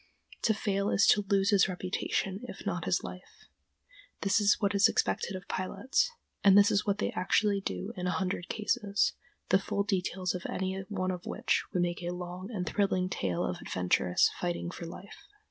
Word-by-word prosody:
To 220 - +2
fail 200 -1 0
is 200 - +4
to 205 -1 +4
lose 200 +1 +3
his 200 -2 +5
reputation 185 +1 -2
if - - -9
not - - -2
his - - +1
life. - - -10 0.8
This 200 +2 +3
is 205 0 +4
what 200 -1 +1
is 200 0 +6
expected 195 - 0
of 185 -1 -8
pilots, 265 - 0 0.3
and 195 0 +7
this 205 0 +6
is 205 +1 +1
what 200 0 +2
they - - -1
actually 200 +2 +1
do 90 - -4
in 180 0 -3
a 180 - 0
hundred 180 -1 -2
cases, 205 -2 0 0.4
the 190 - +5
full 200 +1 -1
details 185 -2 -1
of 180 0 -5
any 190 0 -2
one 185 -3 -1
of 180 -1 -6
which - - 0
would 180 - +1
make 175 0 -2
a 175 - -3
long 180 +2 -6
and 185 -5 -3
thrilling 185 -2 +1
tale 90 - -1
of - - -4
adventurous 90 0 +2
fighting 175 0 -2
for 170 - -7
life. 200 - -11
190 Hz, 190 wpm, -30 LUFS, 180-200 Hz, 0.8 s, and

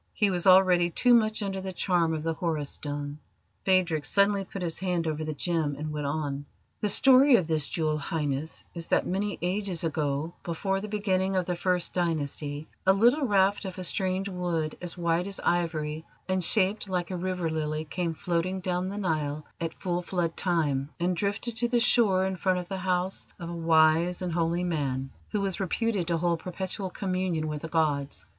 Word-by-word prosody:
He 205 -3 +3
was 180 0 0
already 185 -2 +6
too 245 +8 +3
much 215 -2 +3
under 195 -1 -3
the 190 0 -4
charm 175 -3 +1
of 155 - -4
the 165 0 0
Horus 160 -4 -2
Stone. 145 0 -5 0.5
Phadrig 180 -5 +2
suddenly 200 +2 +3
put 190 0 -6
his 165 -2 -2
hand 180 -3 -1
over 155 -1 -2
the 155 -1 -4
gem 160 -2 0
and 155 +1 -4
went 150 -1 -3
on. 145 -1 -2 0.3
"The 210 - 0
story 265 +5 +6
of 185 -7 +3
this 155 -3 0
jewel, 155 -2 -1
Highness, 150 0 -3
is 170 -1 -7
that - - +2
many 200 +3 -1
ages 185 -1 -1
ago, 155 0 -1
before 195 +3 -1
the 215 - -5
beginning 195 -2 0
of 185 -1 +1
the 180 - -1
First 180 0 0
Dynasty, 150 -3 -2 0.2
a 190 - +5
little 245 +8 +4
raft 200 -1 +3
of 190 -2 -6
a 185 - -4
strange 190 +1 0
wood, 175 -5 -2
as 175 -1 -4
white 170 +1 +1
as 195 - -5
ivory 160 -3 -1 0.2
and 185 -1 0
shaped 200 +3 +2
like 180 -1 -2
a - - -2
river 180 -1 -2
lily, 155 0 -2
came 170 +1 -2
floating 180 +3 -1
down 180 0 -1
the 200 - -5
Nile 155 -6 -1
at 165 -1 -3
full 175 -1 -2
flood 175 -2 -2
time 150 -6 0
and 175 +1 +1
drifted 205 +5 -1
to 240 +1 +1
the 240 0 +2
shore 205 -5 +4
in 190 -1 -2
front 185 +1 +1
of 180 -1 -4
the 190 +1 -4
house 185 0 -1
of 170 0 -6
a - - -5
wise 165 +2 +3
and 175 -2 -2
holy 170 +1 0
man 135 -6 -2 0.2
who 210 - -1
was 195 -2 -2
reputed 195 -1 0
to 170 -1 +1
hold 170 0 +1
perpetual 185 +2 -4
communion 185 -4 -1
with 150 -1 -4
the 165 - -5
gods. 145 -4 0
175 Hz, 195 wpm, -28 LUFS, 160-190 Hz, 0.5 s, already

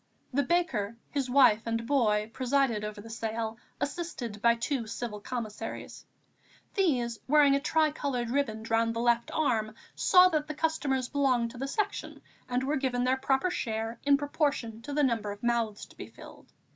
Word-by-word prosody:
The 285 - +3
baker, 250 - 0
his 275 -3 -1
wife 245 -5 +5
and 230 0 -1
boy 220 -5 +1
presided 255 -4 +1
over 210 0 -5
the 225 - -11
sale, 225 0 -3 0.2
assisted 275 -10 -4
by 235 0 +5
two 235 0 -2
Civil 220 -2 -5
Commissaries. 220 -1 -6 0.7
These, 250 - +1
wearing 290 0 +5
a 275 - +3
tricoloured 285 -5 0
riband 230 -5 -1
round 230 0 +2
the - - -2
left 235 0 +2
arm, 220 -8 0 0.2
saw 365 -1 +6
that 310 -3 -1
the 305 - -5
customers 290 -5 0
belonged 255 -5 +1
to 245 - -11
the 270 - -2
Section 410 +7 -3 0.3
and 250 +1 0
were 285 +2 0
given 255 -2 0
their 255 +1 +2
proper 270 +6 +1
share 225 -4 -3
in 280 0 +5
proportion 280 -6 -1
to 285 +5 -6
the 295 0 +2
number 225 -5 0
of 205 +2 -10
mouths 235 -3 0
to - - -19
be - - -8
filled. - - -14
245 Hz, 170 wpm, -29 LUFS, 225-285 Hz, 0.7 s, saw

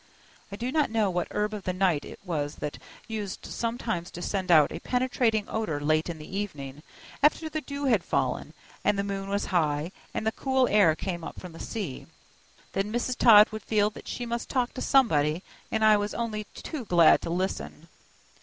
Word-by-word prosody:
I - - -4
do 240 +5 -3
not 300 -2 +2
know 220 -3 +1
what 175 -1 -1
herb 210 +1 -1
of 210 - -4
the 185 -1 -2
night 180 -5 +1
it - - -10
was 150 -5 -2
that 150 - -5 0.3
used 210 -4 -5
sometimes 230 -7 -3
to 175 - -8
send 190 -2 -2
out 155 -3 +6
a - - -5
penetrating 245 -4 +1
odor 215 -10 -2
late 155 +3 +1
in 170 - -4
the 155 +5 -9
evening, 145 -9 -5 0.4
after 305 +2 +3
the 310 0 -3
dew 285 -1 -5
had 225 -9 +3
fallen, - - -1 0.3
and 210 -1 +2
the 200 - 0
moon 195 -1 -4
was 200 +1 0
high, 155 -1 +1 0.2
and - - -3
the 220 - +2
cool 265 +1 +1
air 195 -7 +5
came 170 -1 -4
up - - -7
from 180 - -9
the 165 - -12
sea. 200 - -5 0.7
Then 195 +2 -1
Mrs. 240 +2 -1
Todd 215 -4 +8
would 215 0 -5
feel 210 -1 +1
that - - -12
she 245 - -4
must 235 0 -3
talk 250 -2 0
to - - -6
somebody, 165 - +3 0.3
and 220 0 +2
I 215 -1 +7
was 205 0 -3
only 215 -2 -3
too 295 -7 -6
glad 175 -4 +6
to - - -5
listen. 185 +3 -3
205 Hz, 200 wpm, -27 LUFS, 170-230 Hz, 0.7 s, Todd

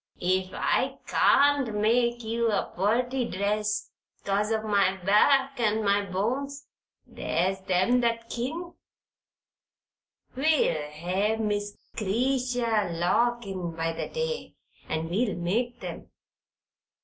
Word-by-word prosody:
Ef 185 +1 +1
I - - 0
can't 280 -5 +3
make 235 +3 +2
ye 225 +1 -3
a 230 -3 +1
purty 245 +7 +1
dress, 210 +2 -1 0.3
'cause 205 +2 0
o' 220 -1 0
my 200 -3 +2
back 265 +8 +3
an' 220 -1 +1
my 200 0 +2
bones, 260 +10 -2 0.4
there's 185 +3 -1
them 190 +8 +3
that 230 -1 0
kin. 320 +10 -4 1.6
We'll 265 - +2
hev 185 +8 -1
Miss 205 -1 -2 0.2
'Cretia 235 -1 0
Lock 240 +7 +1
in 180 -4 -5
by 165 0 -1
the - - -5
day, 480 0 -4 0.3
and 160 +1 -2
we'll 205 +5 0
make 235 +8 -2
'em." - - -7
215 Hz, 115 wpm, -27 LUFS, 195-245 Hz, 1.6 s, can't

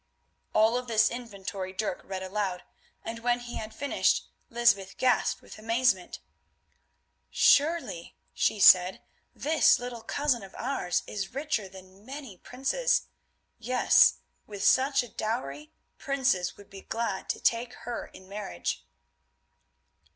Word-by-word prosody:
All 220 +3 +4
of 250 0 -5
this 220 -1 +3
inventory 200 -5 -6
Dirk 190 -2 -3
read 190 -1 -5
aloud, 190 -2 -3 0.4
and 230 +1 -5
when 240 +1 +1
he 240 0 -6
had 215 0 -6
finished 285 +6 0 0.2
Lysbeth 230 -5 +2
gasped 255 -1 +1
with - - -12
amazement. 225 -4 0 1.1
"Surely," 295 - +2 0.2
she 210 - +1
said, 185 -1 +6 0.3
"this 310 +2 +4
little 245 -1 -6
cousin 280 0 0
of 195 -1 -12
ours 250 -8 -1
is 195 +2 -5
richer 275 -9 -2
than 190 +1 -15
many 265 -3 -8
princes. 265 - 0 0.6
Yes, 250 +2 +4 0.3
with 205 -2 -6
such 270 +4 +4
a - - -9
dowry 150 -11 -4 0.3
princes 265 - 0
would 205 0 -16
be 195 0 -10
glad 230 -4 -3
to - - -1
take 240 +1 +1
her 240 0 -4
in 190 - -15
marriage." 195 - -4
225 Hz, 130 wpm, -28 LUFS, 190-250 Hz, 1.1 s, said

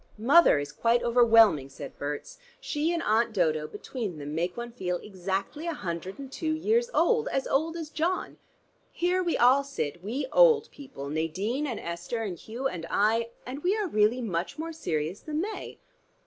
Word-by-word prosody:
"Mother 275 - +6
is 145 0 -3
quite 230 +10 +2
overwhelming," 225 - +5
said 140 +1 -9
Berts. 145 - -5 0.2
"She 320 -9 -1
and 340 -1 -1
Aunt 225 +2 +2
Dodo 155 -5 +1
between 205 - -5
them 145 0 -6
make 175 +5 -2
one 240 0 -5
feel 180 -6 -2
exactly 195 - -4
a 335 - -2
hundred 175 - -5
and 275 -2 -9
two 315 +2 -2
years 460 +9 +1
old, 470 -1 +2
as 270 - -1
old 320 +4 0
as 315 -2 -6
John. 345 +5 -2 0.5
Here 360 +2 +1
we 345 -2 0
all 260 +3 +5
sit, 175 - -4
we 250 +8 -2
old 470 -3 +5
people, 260 - -9
Nadine 185 - -2
and 240 - -3
Esther 170 +7 -4
and 195 -5 -3
Hugh 240 +5 -3
and 165 -9 -6
I, 225 +3 +2 0.2
and 265 +4 -6
we 375 +6 +1
are 420 -3 -1
really 225 -2 +2
much 190 - -3
more 325 +1 -4
serious 165 - -2
than 310 0 -3
they." 425 +4 -5
235 Hz, 180 wpm, -28 LUFS, -, 0.5 s, Mother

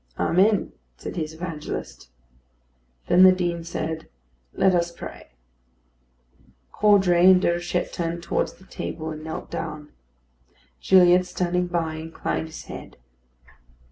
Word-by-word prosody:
"Amen," 200 +4 +2 0.3
said - - -7
his 160 -2 -4
evangelist. 160 - -6 1.0
Then 180 - +4
the 185 0 +9
Dean 175 -2 -1
said, 160 -1 -5 0.4
"Let 190 -1 +2
us 170 -1 +1
pray." 170 - -10 1.4
Caudray 190 -4 +5
and 185 -1 +7
Déruchette 175 0 -1
turned 170 0 -3
towards - - -1
the 190 - -20
table, 160 -3 -5
and 155 0 -8
knelt 160 0 -7
down. 150 -1 -6 0.9
Gilliatt, 180 -1 +5
standing 180 0 -1
by, 165 -2 -2
inclined 160 0 -4
his 160 - -10
head. - - -10
175 Hz, 115 wpm, -24 LUFS, 160-180 Hz, 1.4 s, the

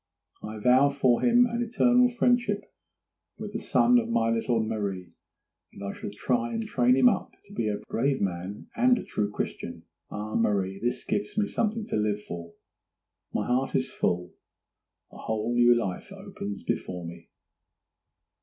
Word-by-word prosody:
I 110 +1 -6
vow 125 +6 +5
for 130 -4 +2
him 245 0 +5
an 235 0 -2
eternal 245 +1 +4
friendship 240 -4 +1 0.7
with - - -7
the - - -2
son 245 0 +4
of 230 0 -3
my 115 - +2
little 115 +1 +1
Marie; 100 -5 -3 0.6
and 100 - -10
I 100 - -3
shall - - -6
try 240 - -1
and 225 0 -2
train 125 - +3
him 130 -2 +6
up - - 0
to - - -15
be 115 -2 -1
a 105 - -1
brave 135 +3 0
man 95 +1 -3
and 245 +1 +4
a - - -4
true 105 -1 -2
Christian. 105 - -5 0.3
Ah, 105 +1 -5
Marie, 100 -3 0
this 120 +3 -2
gives 105 - -2
me 210 - +3
something 220 +1 -1
to - - -2
live 105 -1 0
for. 85 -2 -8 0.8
My - - -1
heart 130 +2 0
is 130 - 0
full—a 90 0 -1 0.8
whole 110 +2 -2
new 120 0 +6
life 95 -5 -4
opens 100 -1 -7
before 90 -2 -3
me! 85 0 -10
120 Hz, 165 wpm, -27 LUFS, -, 0.8 s, him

